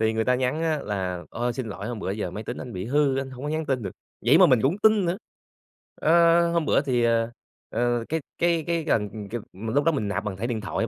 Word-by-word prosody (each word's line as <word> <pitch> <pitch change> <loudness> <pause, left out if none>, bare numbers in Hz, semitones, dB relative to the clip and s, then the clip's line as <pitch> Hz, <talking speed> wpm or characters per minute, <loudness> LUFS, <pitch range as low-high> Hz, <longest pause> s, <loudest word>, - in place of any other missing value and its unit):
Thì 110 0 +2
người 110 0 0
ta 125 - +3
nhắn 130 +5 0
á 160 -2 +1
là 90 -3 -3
"Ôi, 120 +1 -1
xin 125 0 -4
lỗi, 100 0 -6
hôm 120 -3 -4
bữa 95 - -3
giờ 100 -3 -3
máy 105 +4 -6
tính 120 - -5
anh 125 - -7
bị 95 -2 -4
hư 140 +1 +2
anh 135 0 -3
hông 130 +2 -9
có 145 - -2
nhắn 155 0 -2
tin 130 -4 0
được", 95 - -4 0.4
vậy 140 +7 +7
mà 185 - +8
mình 125 -7 +4
cũng 145 +8 +2
tin 215 -2 +5
nữa. 175 +3 -1 0.8
Ơ, 170 +1 +4
hôm 170 -2 +1
bữa - - +4
thì, 125 -4 +1
ờ, 115 0 +2 0.4
ờ, 120 0 0
cái 160 +1 -1 0.2
cái 170 -2 +2
cái 170 -1 0
gần, 105 -7 -1
kiểu 115 0 -4
mà 110 +4 -5
lúc 145 +1 +3
đó 165 - +4
mình 120 -9 -1
nạp 105 +1 -2
bằng 100 -3 -3
thẻ 110 +5 -3
điện 120 -3 -2
thoại 105 - -2
125 Hz, 270 wpm, -25 LUFS, 110-155 Hz, 0.8 s, mà